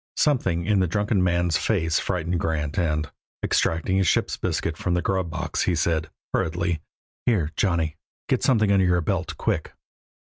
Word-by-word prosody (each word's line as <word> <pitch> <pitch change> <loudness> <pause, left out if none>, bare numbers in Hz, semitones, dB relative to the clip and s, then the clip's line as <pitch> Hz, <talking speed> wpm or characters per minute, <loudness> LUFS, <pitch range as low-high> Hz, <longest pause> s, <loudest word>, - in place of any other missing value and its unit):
Something 95 - +1
in 105 -2 +3
the 95 - +2
drunken 105 +1 +1
man's 85 -2 +2
face 80 -7 +1
frightened 90 -2 -1
Grant 75 -1 -1
and, 75 -3 0 0.3
extracting 85 +4 +1
a - - +3
ship's 90 - +1
biscuit 85 - -2
from 90 +2 -1
the 90 - +1
grub 95 -3 0
box, - - -2
he 90 - +2
said, 80 0 0 0.2
hurriedly: 85 0 0 0.5
"Here, 90 -11 +2
Johnny. 85 -5 0 0.3
Get - - +1
something 110 -6 +3
under 95 -2 +4
your 90 -1 +3
belt, 85 -3 -2
quick." - - -1
85 Hz, 165 wpm, -24 LUFS, 80-95 Hz, 0.5 s, under